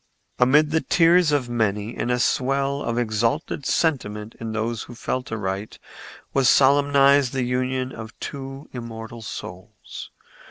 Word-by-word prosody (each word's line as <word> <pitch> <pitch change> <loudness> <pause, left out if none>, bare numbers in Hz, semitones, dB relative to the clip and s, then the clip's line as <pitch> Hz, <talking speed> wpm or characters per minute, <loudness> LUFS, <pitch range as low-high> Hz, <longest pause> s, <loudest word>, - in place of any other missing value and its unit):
Amid 150 +5 +4
the 160 0 +2
tears 170 -1 +4
of 140 -4 +1
many 110 -2 -1
and 120 - -2
a 125 - +2
swell 135 +3 0
of 115 -3 -2
exalted 120 +6 -1
sentiment 110 -9 -1
in 115 -1 -5
those 110 +1 -2
who 120 - -9
felt 125 +1 -3
aright 100 -1 -4 0.6
was 135 -3 +4
solemnized 140 -1 +5
the 130 -2 0
union 130 +1 -1
of 110 -2 -10
two 135 0 -7
immortal 115 -1 -8
souls. 110 - -9
125 Hz, 135 wpm, -23 LUFS, 115-140 Hz, 0.6 s, solemnized